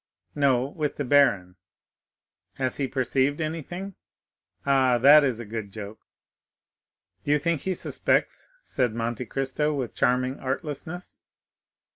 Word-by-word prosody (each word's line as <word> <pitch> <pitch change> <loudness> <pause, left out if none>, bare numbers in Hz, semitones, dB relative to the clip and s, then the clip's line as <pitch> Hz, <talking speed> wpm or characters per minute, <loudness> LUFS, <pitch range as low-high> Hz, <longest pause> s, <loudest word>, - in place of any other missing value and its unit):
"No, 135 -4 +2
with 150 +1 -3
the 145 - -3
baron." 100 -10 +3 1.0
"Has 130 -1 -2
he 140 - -1
perceived 135 +2 0
anything?" 165 +5 -5 0.7
"Ah, 130 -3 +3
that 145 +5 +7
is 130 -5 0
a 120 - -6
good 110 -1 -5
joke!" 105 +1 -8 1.2
"Do - - -6
you 150 - +5
think 160 0 -1
he 190 +2 -1
suspects?" - - 0
said 125 - -1
Monte 120 +1 -3
Cristo 135 +5 -1
with 130 -4 -3
charming 130 +1 +1
artlessness. 150 +5 -5
135 Hz, 125 wpm, -26 LUFS, 125-150 Hz, 1.2 s, that